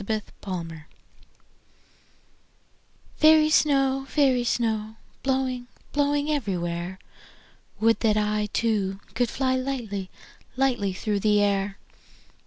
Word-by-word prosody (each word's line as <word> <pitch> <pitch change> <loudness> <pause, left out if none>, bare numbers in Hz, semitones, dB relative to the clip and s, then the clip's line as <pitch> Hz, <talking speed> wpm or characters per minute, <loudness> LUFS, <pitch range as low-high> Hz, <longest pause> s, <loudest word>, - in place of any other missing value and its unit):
Snow 215 +2 -1 0.2
Song 170 -4 -5 2.4
FAIRY 310 0 +6
snow, 270 -3 +3
fairy 265 -5 +3
snow, 220 -2 -1 0.3
Blowing, 260 -2 -1 0.2
blowing 290 +1 +1
everywhere, 180 - -2 0.8
Would 225 +1 +3
that 215 -2 +2
I 210 0 0
Too, 200 -4 0
could 240 0 +1
fly 260 +1 0
Lightly, 235 -8 -3 0.5
lightly 240 -8 +1
through 205 +2 -1
the 210 0 +3
air. 200 -1 0
225 Hz, 95 wpm, -25 LUFS, 200-265 Hz, 2.4 s, FAIRY